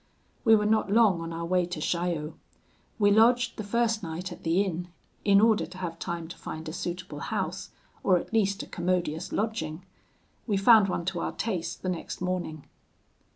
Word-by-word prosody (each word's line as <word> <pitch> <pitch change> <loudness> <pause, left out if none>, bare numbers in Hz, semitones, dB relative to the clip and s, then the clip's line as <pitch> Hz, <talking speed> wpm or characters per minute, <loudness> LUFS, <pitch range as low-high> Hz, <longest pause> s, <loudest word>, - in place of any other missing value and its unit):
"We 225 -2 +7
were 210 -1 +1
not 215 -1 +2
long 210 -6 +4
on 165 0 -5
our 165 0 -4
way 180 0 +1
to 175 -3 -5
Chaillot. 170 -1 -1 0.6
We 205 -2 +4
lodged 235 +3 +4
the 215 - -4
first 225 +1 +1
night 175 +2 -5
at 175 - -9
the 170 +4 +2
inn, 180 -2 -3 0.4
in 200 -1 +5
order 220 0 +3
to 180 - -12
have 170 -3 -5
time 170 -2 -4
to - - -9
find 160 0 -7
a 155 - -5
suitable 175 -3 -5
house, 190 +1 -3 0.3
or 185 -2 +4
at 175 - -6
least 200 -2 +1
a - - -8
commodious 175 -2 -2
lodging. 185 -6 -2 0.6
We 205 -3 +1
found 205 0 +6
one 170 -2 -2
to 185 -1 -2
our - - -2
taste 190 -7 -3
the 185 - -1
next 175 -2 -4
morning. 180 -5 -3
185 Hz, 190 wpm, -28 LUFS, 170-210 Hz, 0.6 s, We